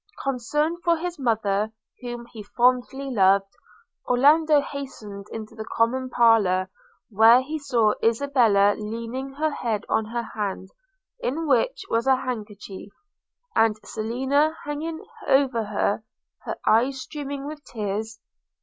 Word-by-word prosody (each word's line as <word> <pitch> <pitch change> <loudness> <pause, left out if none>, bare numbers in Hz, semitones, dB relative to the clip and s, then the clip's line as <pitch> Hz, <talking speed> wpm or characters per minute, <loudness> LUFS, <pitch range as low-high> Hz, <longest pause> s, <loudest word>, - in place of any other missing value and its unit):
Concerned 295 +6 -1
for 340 -1 +3
his 345 0 -5
mother, 220 -3 0 0.3
whom 240 -1 -6
he 220 - -8
fondly 250 +5 +1
loved, 195 -3 +3 0.5
Orlando 295 +4 +5
hastened 215 -9 -7
into 220 -1 -7
the 220 -1 -6
common 255 +3 +1
parlour, 215 -7 +3 0.4
where 225 +4 +7
he 310 +3 -4
saw 235 -7 +2
Isabella 225 -5 +3
leaning 230 +5 -5
her 310 +2 0
head 225 -6 -2
on 220 - +1
her 235 +2 -3
hand, 200 -4 -4 0.5
in 320 - -2
which 295 - +1
was 230 +2 +1
a 265 - +6
handkerchief, 210 -6 -6 0.6
and 225 -1 +3
Selina 265 +8 0
hanging 315 +2 -4 0.2
over 265 -5 +3
her, 210 +1 -1 0.4
her - - -3
eyes 255 +5 +3
streaming 285 -1 -6
with 295 0 -7
tears. 220 0 -4
240 Hz, 125 wpm, -24 LUFS, 215-280 Hz, 0.6 s, where